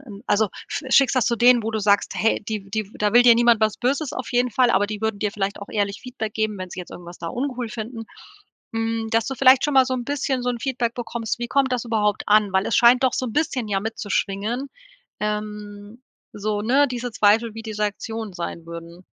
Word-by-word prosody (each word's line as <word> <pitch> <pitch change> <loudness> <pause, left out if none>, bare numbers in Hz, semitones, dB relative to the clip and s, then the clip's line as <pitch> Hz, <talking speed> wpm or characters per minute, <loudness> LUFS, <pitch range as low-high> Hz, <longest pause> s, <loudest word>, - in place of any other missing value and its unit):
'n 210 -8 -12
also, 215 0 +2 0.2
sch 285 - -4
schickst 270 0 +4
das 250 - +2
zu 235 - +2
denen, 245 -1 +5
wo 225 - -1
du 220 - -1
sagst 205 0 +2
hey, 225 - +1
die 215 -2 -2
die 215 -1 -3
da 210 0 0
will 240 +1 +7
dir 240 -1 +7
niemand 235 -1 +4
was 215 -1 +1
Böses 270 +4 -1
auf 255 - -5
jeden 245 +1 +2
Fall, 245 +1 +3
aber 205 0 +2
die 210 -1 -6
würden 220 -2 -1
dir 205 -1 -1
vielleicht 200 -1 -3
auch 200 - -9
ehrlich 200 -1 -2
Feedback 230 -4 -6
geben 215 -1 -1
wenn 185 -1 -6
sie - - -9
jetzt 180 - -10
irgendwas 175 0 -11
da 170 - -6
uncool 250 +1 -3
finden. 225 +1 -6 0.7
Hm, 225 0 -2
dass 225 0 +1
du 270 - -3
vielleicht 260 0 +5
schon 295 -2 0
mal 265 -1 +7
so 255 0 -2
'n 245 - -3
bisschen 275 -1 -1
so 250 - -2
'n 240 - -4
Feedback 245 -3 -2
bekommst, 235 -2 -4
wie 240 - -3
kommt 270 -2 +1
das 245 -1 -1
überhaupt 215 -3 0
an? 210 -1 +4
Weil 190 0 +2
es - - +1
scheint 245 +2 +6
doch 255 - +3
so 255 - -1
'n 225 - -5
bisschen 260 -7 -1
ja 195 -1 0
mitzuschwingen, 220 +3 -2 0.5
ähm, 210 +1 -5 0.3
so, 210 0 -2
ne, 270 +6 +3
diese 245 -1 -4
Zweifel, 220 +2 +3
wie 225 - -7
die 220 -1 -6
Rektionen 210 0 -4
sein 170 -1 -6
würden. 170 +1 -10
225 Hz, 235 wpm, -22 LUFS, 205-245 Hz, 0.7 s, will